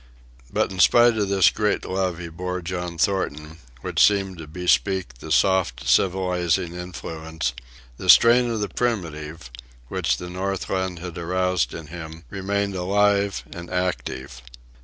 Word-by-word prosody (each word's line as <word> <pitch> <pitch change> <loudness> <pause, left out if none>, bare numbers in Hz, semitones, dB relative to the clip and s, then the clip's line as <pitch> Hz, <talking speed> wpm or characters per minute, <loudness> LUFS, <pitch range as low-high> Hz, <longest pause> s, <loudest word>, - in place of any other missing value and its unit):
But - - 0
in 95 - -7
spite 120 +4 +6
of 105 -2 0
this 95 -2 +5
great 105 -1 0
love 95 -2 -1
he 85 -1 -7
bore 90 +2 -4
John 90 -1 -4
Thornton, 80 -4 -1 0.2
which - - +2
seemed 95 -3 +2
to 80 - -8
bespeak 90 -3 0
the - - -8
soft 85 -11 +2
civilizing 90 +2 +1
influence, 80 -5 -5 0.4
the - - -5
strain 120 +1 +7
of 115 -2 -2
the 105 - 0
primitive, 80 - -3 0.4
which - - 0
the 90 - -7
Northland 95 -1 -2
had 85 0 -7
aroused 90 0 0
in 80 - -7
him, 80 0 -9
remained 100 +1 -1
alive 100 +2 +1
and 85 0 -8
active. 65 -8 -3
90 Hz, 140 wpm, -23 LUFS, 80-95 Hz, 0.4 s, strain